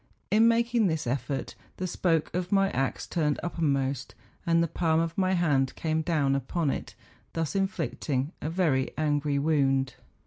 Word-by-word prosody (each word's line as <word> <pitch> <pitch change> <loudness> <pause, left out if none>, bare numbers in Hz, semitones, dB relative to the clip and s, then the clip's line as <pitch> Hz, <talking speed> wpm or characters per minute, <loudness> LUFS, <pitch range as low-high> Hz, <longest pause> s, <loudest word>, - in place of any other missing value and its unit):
In 220 +2 +6
making 235 -1 +3
this 160 -3 -1
effort, 135 +1 -2 0.2
the 185 - -2
spoke 165 -3 0
of 180 0 -2
my 195 -1 +3
axe 135 0 -1
turned 150 -4 0
uppermost, 140 -6 -1 0.3
and 165 0 +4
the - - +1
palm 160 0 +1
of 165 0 -1
my 190 -1 +2
hand 145 -7 +2
came 160 -1 0
down 150 -4 +1
upon 145 +2 -1
it, - - -5 0.4
thus 165 +2 -2
inflicting 160 -7 -1
a 155 - -2
very 160 -7 +1
angry 145 -1 +1
wound. 135 -3 +2
160 Hz, 160 wpm, -28 LUFS, 140-175 Hz, 0.4 s, In